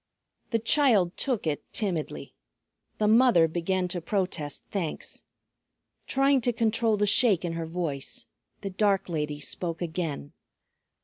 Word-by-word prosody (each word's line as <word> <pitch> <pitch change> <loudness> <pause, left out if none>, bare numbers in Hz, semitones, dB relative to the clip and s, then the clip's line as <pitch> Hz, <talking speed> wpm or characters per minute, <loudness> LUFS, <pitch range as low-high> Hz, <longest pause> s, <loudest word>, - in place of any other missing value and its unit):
The 230 - +2
child 225 - +3
took 250 -9 -1
it 150 -2 -1
timidly. 165 - -3 0.6
The 210 - +1
mother 225 -7 +6
began 180 +3 -1
to 175 0 -3
protest 170 -6 -2
thanks. 180 -6 -4 0.8
Trying 275 0 +3
to 245 - +1
control 225 -1 +2
the 205 - +2
shake 205 -4 +3
in 170 - -2
her 165 -1 -4
voice 160 -5 -4 0.4
the 195 - -4
dark 195 -1 +1
lady 150 -3 -2
spoke 165 +3 -3
again. 160 - -4
185 Hz, 130 wpm, -27 LUFS, 165-220 Hz, 0.8 s, mother